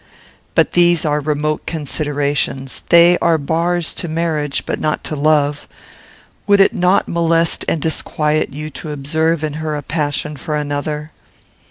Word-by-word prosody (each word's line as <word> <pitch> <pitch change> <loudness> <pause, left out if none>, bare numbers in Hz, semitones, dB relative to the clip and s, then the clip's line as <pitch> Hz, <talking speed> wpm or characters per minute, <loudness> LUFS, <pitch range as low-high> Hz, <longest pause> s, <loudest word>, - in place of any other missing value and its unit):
"But - - +3
these 175 -1 +4
are 150 -1 +1
remote 150 +1 -2
considerations; 145 -3 -2
they 170 +1 +6
are 170 -1 +3
bars 165 +3 -1
to 175 - -4
marriage, 155 -3 -1
but - - -3
not 155 0 -1
to 155 - -4
love. 150 0 +1 0.8
Would 200 -1 +5
it 195 - +5
not 180 +2 +2
molest 165 0 +1
and 165 - 0
disquiet 155 0 0
you 150 +2 -6
to 155 - -8
observe 160 +3 -1
in 155 -2 -2
her 155 -1 -2
a 145 - -5
passion 150 -1 -2
for 150 +4 -4
another?" 150 +1 -3
155 Hz, 150 wpm, -17 LUFS, 145-165 Hz, 0.8 s, they